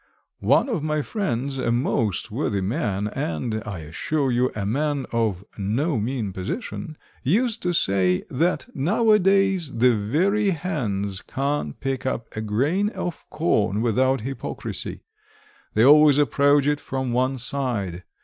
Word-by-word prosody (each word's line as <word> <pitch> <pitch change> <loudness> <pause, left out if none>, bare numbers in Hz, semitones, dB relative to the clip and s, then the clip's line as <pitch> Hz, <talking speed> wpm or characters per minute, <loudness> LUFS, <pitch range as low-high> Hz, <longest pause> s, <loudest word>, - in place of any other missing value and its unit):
One - - +3
of 220 - -1
my 155 0 -1
friends, 135 - -2
a 115 - 0
most 115 -4 0
worthy 100 - -1
man, 100 0 -1
and, 110 +6 -3
I 95 -6 -5
assure 135 - -1
you, 125 +1 +2
a 100 -2 -2
man 145 +5 0
of 110 -6 0 0.2
no 120 - 0
mean 110 -3 -2
position, 155 - -5 0.2
used 225 - +1
to 180 - 0
say, 95 - +2
that 165 +7 +1
nowadays 195 - +3
the 120 +2 +4
very 185 - +1
hens 110 - -2
can't 140 - -2
pick 135 -1 -2
up 115 -3 -4
a 110 - -2
grain 140 - +1
of 175 -5 -6
corn 110 - +1
without 130 +2 +2
hypocrisy 135 +4 -5 0.7
they 110 +3 +5
always 150 0 +7
approach 145 0 +3
it 145 0 +1
from 130 -2 -3
one 130 +2 +1
side. 120 -9 -2
130 Hz, 140 wpm, -24 LUFS, 110-155 Hz, 0.7 s, always